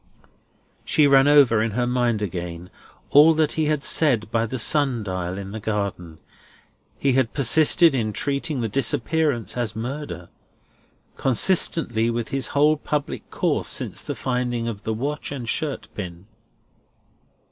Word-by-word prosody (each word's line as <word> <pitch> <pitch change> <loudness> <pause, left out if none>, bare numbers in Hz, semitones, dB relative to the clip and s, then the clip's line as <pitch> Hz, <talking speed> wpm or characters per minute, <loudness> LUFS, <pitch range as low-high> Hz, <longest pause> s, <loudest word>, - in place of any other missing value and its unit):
She 150 - +2
ran 135 -1 +5
over 140 -7 +5
in 110 -2 -1
her 125 - +1
mind 120 -3 0
again, 90 -2 -6 0.4
all 155 +3 +7
that 155 -1 +1
he 160 - -1
had 150 -2 -1
said 120 -9 +1
by 115 -1 0
the 130 - -4
sun 135 -2 +1
dial 90 -2 -4
in 100 -1 -7
the 110 - -6
garden. 100 -6 -4 0.8
He 135 -2 +1
had 130 -3 0
persisted 155 +4 +5
in 115 -5 -1
treating 140 +3 -2
the 115 - -1
disappearance 135 +2 0
as 120 -4 -3
murder, 115 - -6 0.9
consistently 130 - +2
with 115 -1 -3
his 135 -1 -2
whole 150 +2 +2
public 150 -1 -4
course - - -1
since - - -3
the - - -5
finding 125 -2 -2
of 105 -3 -5
the 110 - -1
watch 145 +6 -4
and 130 -5 -6
shirt 150 +4 -3
pin. 90 -2 -8
125 Hz, 145 wpm, -23 LUFS, 110-145 Hz, 0.9 s, all